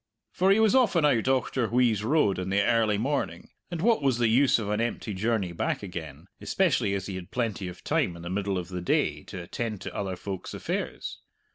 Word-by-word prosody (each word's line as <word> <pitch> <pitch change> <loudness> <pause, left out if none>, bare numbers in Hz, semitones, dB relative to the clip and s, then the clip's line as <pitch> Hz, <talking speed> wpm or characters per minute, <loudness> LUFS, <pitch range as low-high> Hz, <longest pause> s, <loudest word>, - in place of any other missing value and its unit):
For 185 +2 +2
he 200 +2 +5
was 220 -2 +4
often 200 - +4
out 125 -7 +3
Auchterwheeze 125 -4 +2
road 115 -7 +2
in 90 0 -3
the 100 +1 +2
early 110 -1 +2
morning, 115 - -2 0.2
and 170 -1 -4
what 230 -4 +4
was 135 -4 +2
the 120 -2 +2
use 130 +4 +4
of 110 -3 -3
an 105 +2 0
empty 115 -2 -2
journey 100 -2 0
back 85 - -2
again, 80 -5 -7 0.2
especially 130 - +1
as 95 -1 -3
he 100 - -5
had 90 -1 -7
plenty 110 -6 -2
of 90 0 -9
time 85 - 0
in 85 - -10
the 85 - -5
middle 100 0 -1
of 90 -1 -4
the 90 -1 -4
day 90 - +1
to 90 -2 -7
attend 110 +3 -4
to - - -7
other 95 -2 -2
folk's 95 0 -6
affairs? - - -4
110 Hz, 215 wpm, -27 LUFS, 95-130 Hz, 0.2 s, he